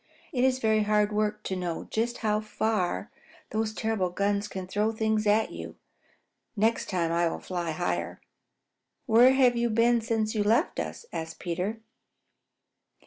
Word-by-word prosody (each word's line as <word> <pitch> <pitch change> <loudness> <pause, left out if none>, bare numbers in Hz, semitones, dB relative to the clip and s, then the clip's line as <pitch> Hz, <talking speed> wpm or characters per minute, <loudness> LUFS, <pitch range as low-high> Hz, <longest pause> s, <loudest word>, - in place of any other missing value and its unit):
It 250 -2 +1
is 260 -1 +3
very 220 -3 +2
hard 210 0 +2
work 210 0 -1
to 190 - -3
know 175 -3 -3
just 235 +2 -1
how 210 0 +2
far 215 - -1 0.4
those 215 0 -1
terrible 220 -4 -1
guns 200 +3 0
can 190 -2 -6
throw 210 +4 0
things 220 -1 0
at 215 +2 +3
you. - - -8 0.8
Next 220 +2 +1
time 170 -4 0
I 170 0 +2
will - - -2
fly 175 -2 -4
higher." 170 +3 -2 0.9
"Where 245 +3 +6
have 255 -2 +4
you 235 0 +1
been 230 +1 +3
since 220 -2 -1
you 215 -2 +1
left 230 - +2
us?" - - -5
asked 160 0 -5
Peter. 185 +6 -3
215 Hz, 155 wpm, -28 LUFS, 190-225 Hz, 0.9 s, Where